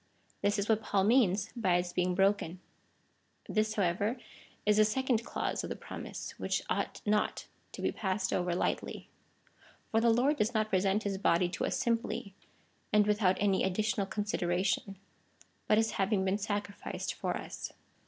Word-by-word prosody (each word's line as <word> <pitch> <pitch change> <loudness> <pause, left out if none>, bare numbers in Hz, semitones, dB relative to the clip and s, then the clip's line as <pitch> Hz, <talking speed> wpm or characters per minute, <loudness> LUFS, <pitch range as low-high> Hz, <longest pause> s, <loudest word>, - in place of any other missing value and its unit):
This 205 +1 +2
is 200 +1 -1
what 220 -1 +3
Paul 195 -3 +1
means 210 -3 +3
by 190 -7 +2
its 175 0 -1
being 180 0 +1
broken. 195 -2 +1 0.9
This, 215 0 0
how 205 - +2
ever, 200 +8 0 0.5
is 210 0 +4
the 215 - +7
second 235 +1 +1
clause - - -2
of - - -4
the - - -3
promise, - - -7
which - - -1
ought - - -2
not 210 0 +1 0.3
to - - -7
be - - +2
passed 190 -1 -1
over 180 0 0
slightly. 175 - -2 0.8
For 225 - +3
the 235 - +4
Lord 255 +6 +3
does 220 +3 0
not 215 0 +1
present 195 +2 +2
his 195 -2 -2
body 175 -2 +3
to 175 - -2
us - - -1
simply, 230 -5 -1 0.6
and 210 -1 +5
without 205 -3 +3
any 195 -2 +2
additional 200 +1 0
considera 190 -3 -1
tion, 195 -1 -1 0.7
but 215 - +4
as 225 0 +2
having 195 0 +1
been 190 +2 +1
sacrificed 205 -1 -3
for - - -2
us. - - -7
205 Hz, 170 wpm, -32 LUFS, 190-215 Hz, 0.9 s, the